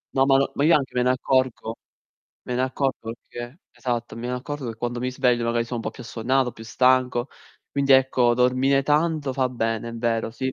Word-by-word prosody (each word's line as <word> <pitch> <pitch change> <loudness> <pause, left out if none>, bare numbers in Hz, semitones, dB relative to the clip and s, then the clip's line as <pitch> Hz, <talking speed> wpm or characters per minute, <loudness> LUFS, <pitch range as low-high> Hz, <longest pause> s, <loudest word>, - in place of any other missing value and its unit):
No, 135 - +4
ma 135 -1 +5
n - - +4
ma 140 - 0
io 165 +3 +6
anche 135 -3 -1
me 125 - +2
ne 125 - +3
accorgo, 130 -3 0 0.7
me 125 - -4
ne 125 - 0
accorgo 130 -3 -2
perché 120 +6 -10
esatto, 120 -2 -4
me 120 +1 -5
ne 125 - -2
accorgo 135 0 -5
che 115 - -6
quando 120 +1 -3
mi 125 +1 -1
sveglio 125 -2 +1
magari 115 0 0
sono 120 +1 -5
un 115 - -4
po' 110 - -3
più 125 - -11
assonnato, 125 +3 0
più 110 - -12
stanco. 125 +2 +2 0.4
Quindi 140 -1 +2
ecco, 130 -2 +4
dormire 130 +2 +3
tanto 150 -1 +1
fa 130 -1 0
bene, 115 -2 -2
è 115 - -7
vero, 115 -1 -1
sì. 130 +3 -3
125 Hz, 215 wpm, -24 LUFS, 120-135 Hz, 0.7 s, io